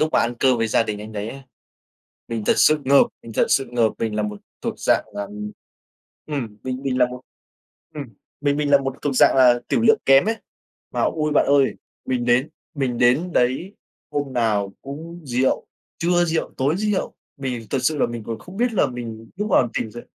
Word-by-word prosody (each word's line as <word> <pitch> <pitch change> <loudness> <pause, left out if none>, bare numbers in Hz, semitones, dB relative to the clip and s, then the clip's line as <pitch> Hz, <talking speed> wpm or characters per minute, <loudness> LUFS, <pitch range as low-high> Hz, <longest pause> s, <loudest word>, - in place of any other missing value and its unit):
lúc 155 - +3
mà - - +4
ăn 120 +1 +1
cơm 130 -1 +3
với 115 - +1
gia 115 - +3
đình 105 -2 -4
anh 110 +1 -8
đấy 105 +1 -4
ấy. 135 +3 -9 0.9
Mình 115 -2 -3
thật - - +5
sự 155 0 +5
ngợp, 140 +1 +6 0.2
mình 115 - -10
thật - - +2
sự 135 - +3
ngợp, 115 -3 +2
mình 110 -2 -2
là 105 - 0
một 105 -1 -4 0.2
thuộc - - -2
dạng - - +2
là, 100 - -3
ừm 105 +1 -7 0.8
ừm, 125 -9 -4
mình 130 0 -4
mình 130 -2 -1
là 125 - +5
một 125 0 -8 0.7
ừm, 145 -2 -5 0.4
mình 145 0 +1
mình 145 -1 0
là 140 - +7
một 135 -1 -3
thuộc 145 -2 -1
dạng - - +5
là 125 -2 +6
tửu - - +2
lượng 225 -1 +5
kém 135 +2 +7
ấy, 225 - 0 0.6
mà - - -1
ôi 155 -1 0
bạn - - +4
ơi, 140 -1 +3 0.3
mình 125 -2 -1
đến 125 +4 +3 0.3
mình 130 -5 -1
đến 135 +9 +3
đấy 135 +11 +1 0.4
hôm 145 -2 -2
nào 105 -5 0
cũng 160 +5 -8
rượu, 130 0 0 0.3
trưa 175 +1 +2
rượu, 165 -1 -2
tối 140 +6 +1
rượu 210 -1 -1 0.2
mình 125 -5 -4
thật 135 - +1
sự 150 +3 +1
là - - +3
mình 120 -1 -6
còn 115 -1 -4
không 180 +9 -12
biết 240 +1 +1
là 180 - +3
mình 115 -3 -7
lúc 210 +2 -2
nào 120 -9 +4
tỉnh 110 - -3
dậy 120 +1 -9
130 Hz, 215 wpm, -22 LUFS, 115-150 Hz, 0.9 s, là